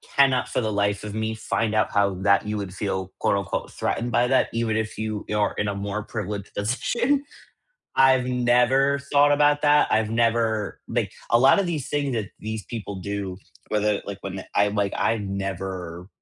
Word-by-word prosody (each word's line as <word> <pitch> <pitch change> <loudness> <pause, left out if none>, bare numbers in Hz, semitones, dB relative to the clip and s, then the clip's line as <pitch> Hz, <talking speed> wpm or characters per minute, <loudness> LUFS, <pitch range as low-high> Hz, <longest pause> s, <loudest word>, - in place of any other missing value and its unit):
cannot 135 -2 +4
for - - -1
the 110 -2 -1
life 100 0 0
of 105 -1 -6
me 110 0 -2
find 110 0 -1
out 110 - +2
how 100 -1 +2
that 100 +1 +4
you 105 - -2
would 100 -3 -5
feel, 95 -1 -3
quote - - +2
unquote 100 0 -3
"threatened 120 +1 -2
by 120 - +3
that," 130 +1 +3
even 115 -1 0
if 110 0 -3
you 110 -1 -3
are 105 -1 +1
in 105 - -1
a 100 - -2
more 100 +1 -3
privileged 105 -2 -5
position. 240 - 0 0.7
I've 130 -1 +5
never 125 +3 +3
thought 145 0 +5
about 145 0 +3
that. 150 0 +4
I've 110 0 +2
never, 115 -2 0
like, - - -1 0.2
a 120 - +5
lot 135 +9 +6
of 200 - +1
these 160 -7 -3
things 140 -2 -1
that 110 -4 -2
these 110 -1 -5
people 105 -3 -6
do, 100 -1 -4 0.3
whether, 105 -1 0
like 100 -1 -6
when 95 -1 -6
I'm, 105 +1 +2
like, 100 -1 0
I've 115 0 +1
never 95 -3 -5
110 Hz, 190 wpm, -24 LUFS, 100-125 Hz, 0.7 s, lot